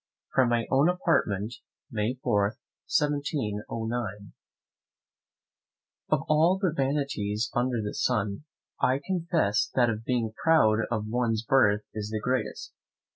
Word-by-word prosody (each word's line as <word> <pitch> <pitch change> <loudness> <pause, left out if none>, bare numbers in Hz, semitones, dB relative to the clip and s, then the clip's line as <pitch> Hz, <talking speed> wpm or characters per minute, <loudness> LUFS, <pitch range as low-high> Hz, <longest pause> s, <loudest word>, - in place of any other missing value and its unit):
From 130 -2 +4
my 120 -1 +1
own 140 +5 +4
Apartment, 120 - 0 0.3
May, 110 +3 -1
4, 100 +2 +1 0.3
1709. 115 - -2 1.8
Of 155 -3 +2
all 160 +5 +4
the 185 -5 +1
vanities 135 -7 -1
under 120 -2 0
the 105 - -4
sun, 105 +1 -1 0.4
I 130 +2 +3
confess 165 - +1
that 120 -2 +4
of 110 0 -5
being 115 -3 -1
proud 115 -10 +4
of 110 -3 -2
one's 115 -1 0
birth 105 -5 +3
is 105 -1 -4
the 110 0 -2
greatest. 125 +4 -2
120 Hz, 120 wpm, -27 LUFS, 105-140 Hz, 1.8 s, From